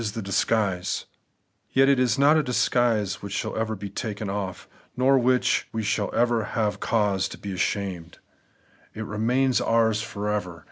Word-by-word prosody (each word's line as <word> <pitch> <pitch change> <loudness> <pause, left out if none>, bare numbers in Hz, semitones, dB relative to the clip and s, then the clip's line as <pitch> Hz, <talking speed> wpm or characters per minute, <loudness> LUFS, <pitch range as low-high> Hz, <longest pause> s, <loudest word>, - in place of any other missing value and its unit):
80 105 -2 -3
The - - -4
Everlasting 115 +3 +2
Righteousness, 95 -4 -1 0.3
» - - -44
Yet 135 +1 +5
it 140 -2 +4
is 130 +1 +2
not 145 +3 +5
a 155 - +4
disguise 120 -6 +1
which 100 -1 -6
shall - - -3
ever 110 0 -1
be 100 0 -7
taken 105 -1 -4
o£f, 95 -2 -4 0.3
nor 135 +2 +4
of 125 - +1
which 125 0 +2
we 110 -1 -3
shall 100 0 0
have 115 -3 0
cause 105 -4 +1
to - - -9
be 100 - -6
ashamed. 90 -3 -3 0.8
It 110 - -5
remains 120 +5 +1
ours 110 -2 +2
for 105 -1 -5
ever. 90 -5 -2
110 Hz, 180 wpm, -25 LUFS, 100-120 Hz, 0.8 s, Yet